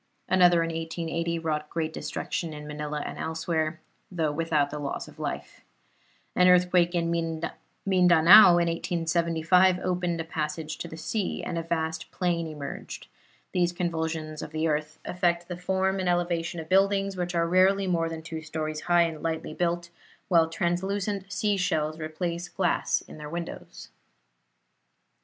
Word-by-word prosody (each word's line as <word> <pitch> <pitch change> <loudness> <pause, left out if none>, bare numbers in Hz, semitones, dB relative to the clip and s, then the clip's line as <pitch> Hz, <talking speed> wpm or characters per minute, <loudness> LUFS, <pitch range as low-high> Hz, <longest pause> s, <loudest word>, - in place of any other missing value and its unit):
Another 175 -2 +5
in 165 - -2
1880 165 +1 -2
wrought 155 -2 -2
great 160 -1 -2
destruction 165 0 -4
in 150 0 -8
Manila 150 0 -4
and - - -6
elsewhere, 160 0 -2 0.3
though 160 -4 0
without 150 -2 0
loss 145 -2 -4
of - - -15
life. - - -5 0.7
An 180 - +5
earthquake 180 -1 +4
in 170 -1 0
Mindanao 175 +2 +5
in 170 - +3
1675 170 +2 +2
opened 180 -2 -1
a - - -1
passage 155 -1 -4
to - - -5
the 160 - -9
sea, 200 +4 -2
and 175 - -3
a 165 - -1
vast 160 -1 -3
plain 170 -3 -1
emerged. 150 -3 -7 0.4
These 175 -1 +1
convulsions 160 -3 -3
of - - -6
the 160 +1 0
earth 150 0 -2
affect 175 -1 0
the 180 - -5
form 190 +2 0
and 185 -1 0
elevation 175 -1 0
of 160 - -7
buildings, 195 +1 +2
which 180 -1 -3
are 170 0 +2
rarely 190 +3 +4
more 165 -3 0
than 160 -1 -6
two 160 -1 -6
stories 155 -1 -4
high 175 -1 +4
and 160 -2 -3
lightly 160 -1 -3
built, 175 0 -1 0.4
while 165 -3 +4
translucent 190 +3 -2
sea 205 +1 0
shells 155 -4 0
replace 170 +2 -4
glass 180 -2 0
in - - -12
their 150 0 -7
windows. 170 - -7
170 Hz, 150 wpm, -27 LUFS, 160-180 Hz, 0.7 s, Another